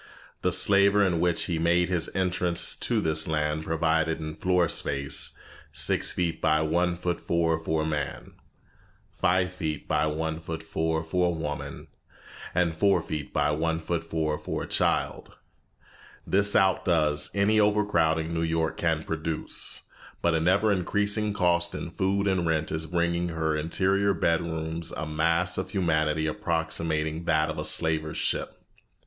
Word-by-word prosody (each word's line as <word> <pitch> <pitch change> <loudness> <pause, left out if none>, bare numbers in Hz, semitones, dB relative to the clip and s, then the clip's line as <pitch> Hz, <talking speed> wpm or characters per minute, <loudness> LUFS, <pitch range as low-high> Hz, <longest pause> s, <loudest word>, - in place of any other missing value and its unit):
The - - +1
slaver 100 0 +4
in 90 -3 +1
which 85 -1 +1
he 85 -3 -2
made 85 +1 +2
his 90 -3 -1
entrance 90 -2 +1
to - - -1
this 80 -1 +1
land 75 0 -1
provided 80 0 +1
in 80 -1 -5
floor 90 +1 +1
space 70 -2 0 0.3
six - - +2
feet 85 -2 -2
by 80 -1 +3
one 85 +3 +1
foot 90 0 -3
four 80 -1 +1
for 80 -1 -1
a - - -2
man, 75 -3 -4 0.8
five 90 0 +1
feet 80 -5 -4
by - - +1
one 80 +1 -2
foot 80 0 -6
four 80 0 -1
for 90 +2 0
a 85 -2 -2
woman, 75 -2 -5 0.7
and 85 -2 +1
four 100 +4 +2
feet 75 -3 -5
by 75 0 +1
one 80 +2 0
foot 85 +1 -2
four 80 -2 -2
for - - -4
a - - -7
child. - - 0 0.9
This 100 +1 +2
outdoes 85 -6 +2
any 105 +2 +3
overcrowding 85 -7 +2
New 80 - -1
York 80 -1 -1
can 80 -2 0
produce, 80 0 -2 0.4
but 85 - +1
an 80 +1 +1
ever 100 +4 +3
increasing 105 +3 +1
cost 85 -3 +1
in 85 - -5
food 100 +2 0
and 95 -3 +1
rent 80 -1 0
is 80 0 -3
bringing 85 0 0
into 80 - -6
her 80 -1 0
interior 95 +5 +1
bedrooms 80 -1 -1
a 75 - -3
mass 85 +4 0
of 95 0 -4
humanity 80 -5 0
approximating 80 0 -2
that 80 -2 +2
of - - -7
the - - -2
slaver's 80 -1 +1
ship. - - -2
80 Hz, 155 wpm, -27 LUFS, 80-90 Hz, 0.9 s, slaver